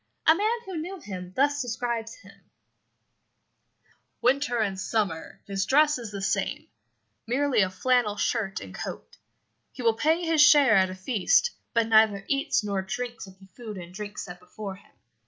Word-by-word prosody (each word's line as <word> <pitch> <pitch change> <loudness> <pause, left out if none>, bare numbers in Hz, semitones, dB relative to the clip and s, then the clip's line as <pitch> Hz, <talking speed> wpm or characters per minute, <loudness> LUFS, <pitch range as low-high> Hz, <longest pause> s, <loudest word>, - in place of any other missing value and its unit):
A 320 - +8
man 430 +7 0
who 380 -3 -6
knew 375 +4 -6
him 180 - -8
thus 285 +1 +2
describes 235 -2 -3
him - - -18 1.8
'Winter 260 0 +1
and 200 -4 -1
summer 190 -5 -2
his 195 -1 -2
dress 300 0 +4
is 230 -3 -7
the 200 -1 -6
same 195 0 -1 0.6
merely 270 0 +2
a 190 - +2
flannel 210 +2 +1
shirt 200 -3 -1
and - - -10
coat. - - -7 0.5
He 255 - -8
will 230 -1 +4
pay 320 +9 +1
his 325 -2 +3
share 295 -5 +7
at 190 -1 +4
a 185 - -6
feast, 210 - +2 0.2
but 230 -1 +3
neither 220 -3 +4
eats 275 -4 +1
nor 200 -2 -1
drinks 240 +3 -5
of 190 0 -15
the 190 - -17
food 210 +2 -9
and 175 -1 -9
drink 205 +1 -7
set 175 -2 -7
before 195 +2 -8
him. - - -23
225 Hz, 170 wpm, -26 LUFS, 195-275 Hz, 1.8 s, A